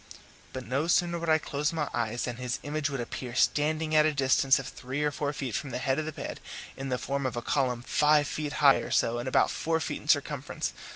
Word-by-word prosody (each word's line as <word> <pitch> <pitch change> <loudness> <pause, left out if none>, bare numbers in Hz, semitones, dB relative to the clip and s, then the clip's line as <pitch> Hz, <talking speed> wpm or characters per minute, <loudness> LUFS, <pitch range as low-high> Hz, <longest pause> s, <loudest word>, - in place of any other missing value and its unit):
But 130 -1 -6
no 140 +6 -1
sooner 170 0 +2
would 165 0 -3
I 155 - +6
close 150 -1 -2
my 155 -3 -2
eyes 120 0 -1
than 120 -1 -3
his 125 0 -2
image 150 0 -1
would 135 -2 -4
appear 120 +1 -5
standing 155 +3 +1
at 155 0 +6
a 155 - +3
distance 135 -1 +3
of 135 - -5
three 130 +3 -4
or 150 - +1
four 145 0 -2
feet 135 -5 -4
from 140 - -3
the 125 - -3
head 130 +2 0
of 155 - -2
the 155 - -3
bed, - - -6 0.4
in 135 0 -5
the 125 - 0
form 140 +1 -2
of 120 - -4
a 120 - -3
column 125 -4 0
five 150 +2 +3
feet 150 0 -3
high 140 -3 +6
or - - -5
so 120 +1 +1
and 120 - -5
about - - +3
four 160 0 0
feet - - -4
in - - -14
circumference. 145 -2 0
140 Hz, 245 wpm, -28 LUFS, 130-150 Hz, 0.4 s, I